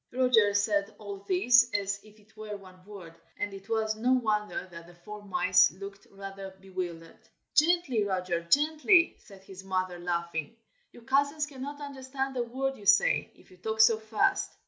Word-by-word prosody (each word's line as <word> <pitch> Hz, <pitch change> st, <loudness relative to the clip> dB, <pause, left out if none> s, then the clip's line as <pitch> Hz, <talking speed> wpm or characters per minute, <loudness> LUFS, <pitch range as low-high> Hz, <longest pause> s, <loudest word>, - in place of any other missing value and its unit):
Roger 245 Hz, -5 st, +3 dB
said 205 Hz, 0 st, 0 dB
all 205 Hz, -2 st, -7 dB
this 240 Hz, +6 st, +4 dB
as 200 Hz, 0 st, -1 dB
if 215 Hz, 0 st, -19 dB
it 215 Hz, +1 st, -25 dB
were 215 Hz, -1 st, -7 dB
one 185 Hz, -2 st, -16 dB
word, 195 Hz, -5 st, -11 dB, 0.2 s
and 205 Hz, -1 st, -3 dB
it 195 Hz, +2 st, -11 dB
was 220 Hz, -1 st, 0 dB
no 245 Hz, +4 st, +1 dB
wonder 215 Hz, -6 st, -1 dB
that 170 Hz, 0 st, -11 dB
the 175 Hz, -, -16 dB
four 210 Hz, +4 st, -10 dB
mice 185 Hz, -2 st, +4 dB
looked 195 Hz, +1 st, -10 dB
rather 195 Hz, -1 st, -9 dB
bewildered. 180 Hz, -3 st, -7 dB, 0.3 s
"Gently, 305 Hz, -8 st, +3 dB
Roger! 185 Hz, -3 st, -2 dB
gently!" 310 Hz, -, +3 dB
said 195 Hz, -3 st, -16 dB
his 190 Hz, -1 st, -11 dB
mother, 185 Hz, -2 st, -2 dB
laughing. 170 Hz, +2 st, -3 dB, 0.4 s
"Your 240 Hz, -, -16 dB
cousins 285 Hz, +4 st, +1 dB
cannot 285 Hz, 0 st, -8 dB
understand 270 Hz, -1 st, -5 dB
a 250 Hz, -, 0 dB
word 265 Hz, +3 st, -3 dB
you 205 Hz, -2 st, -10 dB
say, 205 Hz, +1 st, +4 dB
if -, -, -22 dB
you 185 Hz, -, -17 dB
talk 220 Hz, +4 st, -4 dB
so 220 Hz, 0 st, +6 dB
fast." 220 Hz, -, 0 dB
210 Hz, 170 wpm, -29 LUFS, 190-250 Hz, 0.4 s, so